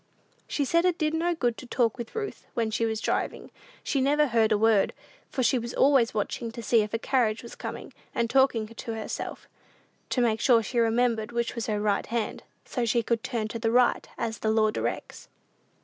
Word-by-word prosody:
She 285 Hz, -, -1 dB
said 335 Hz, +5 st, +3 dB
it 360 Hz, -2 st, +2 dB
did 310 Hz, -2 st, 0 dB
no 340 Hz, +2 st, +1 dB
good 240 Hz, -7 st, 0 dB
to 255 Hz, -, -10 dB
talk 240 Hz, -1 st, +1 dB
with 235 Hz, -, -7 dB
Ruth 430 Hz, -2 st, -5 dB
when 225 Hz, -2 st, 0 dB
she 230 Hz, +1 st, +1 dB
was 220 Hz, -1 st, -2 dB
driving; -, -, -2 dB, 0.3 s
she 275 Hz, -, 0 dB
never 295 Hz, +3 st, +3 dB
heard 225 Hz, -4 st, +2 dB
a 215 Hz, -, +4 dB
word, 220 Hz, -2 st, +3 dB, 0.4 s
for 260 Hz, -, -1 dB
she 250 Hz, +2 st, +3 dB
was 235 Hz, +1 st, -6 dB
always 270 Hz, -4 st, +4 dB
watching 225 Hz, +2 st, -3 dB
to 235 Hz, -1 st, -7 dB
see 225 Hz, +1 st, +4 dB
if 210 Hz, 0 st, -3 dB
a -, -, 0 dB
carriage 230 Hz, -2 st, +1 dB
was 235 Hz, -, -9 dB
coming, -, -, -7 dB, 0.2 s
and 235 Hz, -, +1 dB
talking 265 Hz, -3 st, +3 dB
to 230 Hz, +1 st, -6 dB
herself, 220 Hz, -, -5 dB, 0.6 s
to -, -, 0 dB
make 225 Hz, -3 st, +2 dB
sure 235 Hz, -3 st, +5 dB
she 240 Hz, +4 st, -1 dB
remembered 230 Hz, -1 st, +1 dB
which 235 Hz, -1 st, -1 dB
was 235 Hz, -2 st, -4 dB
her 210 Hz, -2 st, 0 dB
right 205 Hz, -1 st, 0 dB
hand, 230 Hz, -2 st, -2 dB, 0.2 s
so 245 Hz, -, -2 dB
she 235 Hz, 0 st, +2 dB
could 230 Hz, 0 st, -1 dB
"turn 230 Hz, -5 st, -2 dB
to 230 Hz, -, -5 dB
the 225 Hz, 0 st, +1 dB
right, 245 Hz, +1 st, +3 dB
as 225 Hz, 0 st, -3 dB
the 220 Hz, -, 0 dB
law 215 Hz, -1 st, +3 dB
directs." -, -, -4 dB
235 Hz, 210 wpm, -27 LUFS, 220-255 Hz, 0.6 s, sure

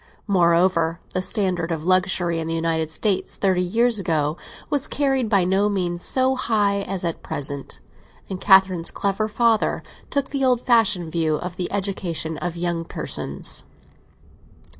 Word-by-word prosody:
Moreover, 170 Hz, -3 st, +2 dB
the 185 Hz, -, 0 dB
standard 185 Hz, -5 st, -1 dB
of 160 Hz, -1 st, -3 dB
luxury 185 Hz, -2 st, +1 dB
in 160 Hz, -, -4 dB
the 165 Hz, -, -2 dB
United 165 Hz, -1 st, -1 dB
States 195 Hz, +4 st, -1 dB
thirty 185 Hz, -2 st, +1 dB
years 225 Hz, +5 st, +3 dB
ago 155 Hz, -4 st, 0 dB, 0.4 s
was 285 Hz, -2 st, +1 dB
carried 270 Hz, -5 st, 0 dB
by 200 Hz, -4 st, +3 dB
no 190 Hz, +3 st, +2 dB
means 175 Hz, -3 st, -2 dB
so 260 Hz, 0 st, +3 dB
high 205 Hz, -5 st, +1 dB
as 190 Hz, -2 st, -4 dB
at 170 Hz, -, -3 dB
present, 140 Hz, -1 st, -4 dB, 0.5 s
and 190 Hz, -1 st, -6 dB
Catherine's 190 Hz, -4 st, +4 dB
clever 200 Hz, +2 st, -1 dB
father 225 Hz, 0 st, +1 dB, 0.3 s
took 280 Hz, -1 st, -2 dB
the 275 Hz, -1 st, -1 dB
old 250 Hz, -2 st, +3 dB
fashioned 210 Hz, -9 st, +2 dB
view 160 Hz, -2 st, 0 dB
of 175 Hz, +3 st, -5 dB
the 180 Hz, -1 st, -3 dB
education 180 Hz, -5 st, -3 dB
of 175 Hz, -1 st, -4 dB
young 170 Hz, -1 st, -2 dB
persons. -, -, -1 dB
185 Hz, 150 wpm, -22 LUFS, 170-210 Hz, 0.5 s, Catherine's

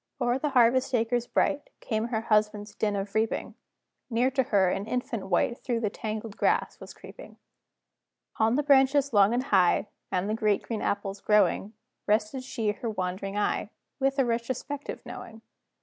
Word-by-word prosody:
O'er 245 Hz, 0 st, +1 dB
the 300 Hz, -, -1 dB
harvest 255 Hz, 0 st, +3 dB
acres 240 Hz, +1 st, 0 dB
bright, 290 Hz, 0 st, 0 dB
Came 220 Hz, -1 st, -2 dB
her 225 Hz, -2 st, -1 dB
husband's 210 Hz, -1 st, +1 dB
din 210 Hz, -1 st, -1 dB
of 195 Hz, 0 st, -4 dB
reaping; 220 Hz, 0 st, -1 dB, 0.6 s
Near 245 Hz, +2 st, +2 dB
to 265 Hz, +1 st, +2 dB
her, 200 Hz, -6 st, +2 dB
an 195 Hz, +3 st, -3 dB
infant 230 Hz, -5 st, -3 dB
wight 215 Hz, +6 st, +1 dB
Through 235 Hz, -2 st, -2 dB
the 210 Hz, -3 st, -1 dB
tangled 215 Hz, -1 st, -5 dB
grass -, -, +1 dB
was -, -, -10 dB
creeping. -, -, -13 dB, 1.0 s
On 225 Hz, +2 st, +3 dB
the 295 Hz, -, +1 dB
branches 275 Hz, -1 st, +4 dB
long 200 Hz, 0 st, +5 dB
and 245 Hz, +2 st, 0 dB
high, 195 Hz, -3 st, +3 dB, 0.2 s
And 185 Hz, +2 st, 0 dB
the 215 Hz, -, -1 dB
great 215 Hz, -2 st, +1 dB
green 225 Hz, -3 st, -4 dB
apples 200 Hz, -1 st, -2 dB
growing, 210 Hz, 0 st, +2 dB, 0.3 s
Rested 215 Hz, +5 st, +1 dB
she 230 Hz, -5 st, -1 dB
her 225 Hz, +3 st, -5 dB
wandering 195 Hz, 0 st, -3 dB
eye, 210 Hz, 0 st, 0 dB, 0.3 s
With 270 Hz, +1 st, +1 dB
a 270 Hz, -, +3 dB
retrospective 250 Hz, +5 st, -4 dB
knowing. 225 Hz, 0 st, -9 dB
225 Hz, 165 wpm, -27 LUFS, 210-250 Hz, 1.0 s, long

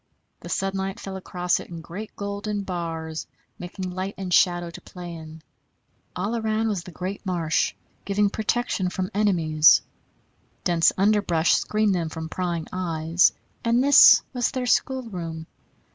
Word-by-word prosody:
The -, -, -10 dB
sunlight 195 Hz, 0 st, -2 dB
fell 195 Hz, -1 st, -7 dB
across 180 Hz, -1 st, -1 dB
it -, -, -10 dB
in 170 Hz, -1 st, -7 dB
great 185 Hz, +6 st, -8 dB
golden 200 Hz, 0 st, -4 dB
bars, 165 Hz, -3 st, -4 dB, 0.3 s
making 180 Hz, +1 st, -6 dB
light 185 Hz, +2 st, -4 dB
and 185 Hz, -2 st, -4 dB
shadow 175 Hz, -1 st, +3 dB
to -, -, -11 dB
play 175 Hz, -1 st, -9 dB
in; 160 Hz, -1 st, -10 dB, 0.7 s
all 200 Hz, +6 st, -2 dB
around 220 Hz, 0 st, 0 dB
was 200 Hz, -4 st, -2 dB
the 180 Hz, -, -11 dB
great 185 Hz, +4 st, -5 dB
marsh, 170 Hz, -5 st, 0 dB, 0.3 s
giving 200 Hz, +1 st, +1 dB
protection 220 Hz, -4 st, -1 dB
from 185 Hz, 0 st, -3 dB
enemies; 165 Hz, -7 st, +4 dB, 0.8 s
dense 170 Hz, -2 st, +3 dB
underbrush 195 Hz, -5 st, +3 dB
screened 215 Hz, -1 st, +1 dB
them 170 Hz, -3 st, -1 dB
from 160 Hz, 0 st, -6 dB
prying 170 Hz, -3 st, -2 dB
eyes 170 Hz, -1 st, +2 dB, 0.3 s
and 235 Hz, +2 st, +2 dB
this 285 Hz, 0 st, +8 dB
was 245 Hz, -2 st, +1 dB
their 255 Hz, -2 st, -3 dB
schoolroom. 185 Hz, -12 st, -1 dB
185 Hz, 145 wpm, -24 LUFS, 170-205 Hz, 0.8 s, this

